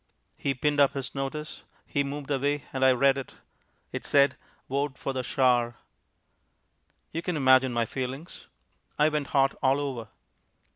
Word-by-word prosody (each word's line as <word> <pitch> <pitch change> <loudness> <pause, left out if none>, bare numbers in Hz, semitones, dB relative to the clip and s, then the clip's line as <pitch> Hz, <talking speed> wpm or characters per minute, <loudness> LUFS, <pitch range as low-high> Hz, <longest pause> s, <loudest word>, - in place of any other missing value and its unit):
He 140 -1 -2
pinned 145 +3 0
up 140 -1 +5
his 135 -2 -5
notice. 140 +3 -5 0.2
He 140 - 0
moved 145 +1 -5
away, 145 +1 0
and 130 0 -1
I 130 - +7
read 135 +2 +3
it. 135 - -9 0.6
It - - -5
said: 140 0 +4 0.3
"VOTE 140 0 -2
FOR 135 - -3
THE 130 - -1
SHAR." 120 -2 +2 1.4
You 165 - -3
can 175 -2 -2
imagine 130 -2 +5
my 120 -1 +1
feelings. 130 +7 -6 0.5
I 150 +1 +4
went 150 -2 -2
hot 135 -1 +3
all 135 +1 +3
over. 130 -6 -4
135 Hz, 155 wpm, -27 LUFS, 130-145 Hz, 1.4 s, I